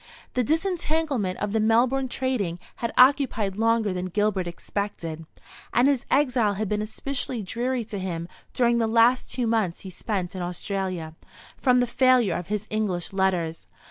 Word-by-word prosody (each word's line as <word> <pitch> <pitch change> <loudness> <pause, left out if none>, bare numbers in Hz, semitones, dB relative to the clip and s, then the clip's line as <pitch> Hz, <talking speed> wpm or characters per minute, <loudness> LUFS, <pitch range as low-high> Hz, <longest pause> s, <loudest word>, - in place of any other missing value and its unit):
The 250 - +1
disentanglement 315 - 0
of 205 0 -3
the 220 - +2
Melbourne 240 +5 +3
trading 245 -10 -1 0.2
had 235 - -2
occupied 250 -7 +4
longer 225 -2 +2
than 180 0 -3
Gilbert 200 -1 0
expected; 170 -3 -5 0.5
and 245 +3 +5
his 280 -3 +1
exile 250 -7 +2
had 215 +2 -2
been 210 +2 -1
especially 235 +1 -3
dreary 240 +4 -2
to 205 -2 -5
him 170 -3 -4 0.2
during 235 -1 +2
the 225 - +2
last 230 +3 +3
two 250 - -1
months 220 -7 0
he 190 - -8
spent 185 -2 -3
in 185 - -4
Australia, 180 -2 -3 0.4
from 250 -2 +3
the - - +3
failure 250 -3 +3
of 175 - -4
his 210 0 -2
English 195 -5 -1
letters. 180 -4 0
215 Hz, 160 wpm, -25 LUFS, 190-250 Hz, 0.5 s, and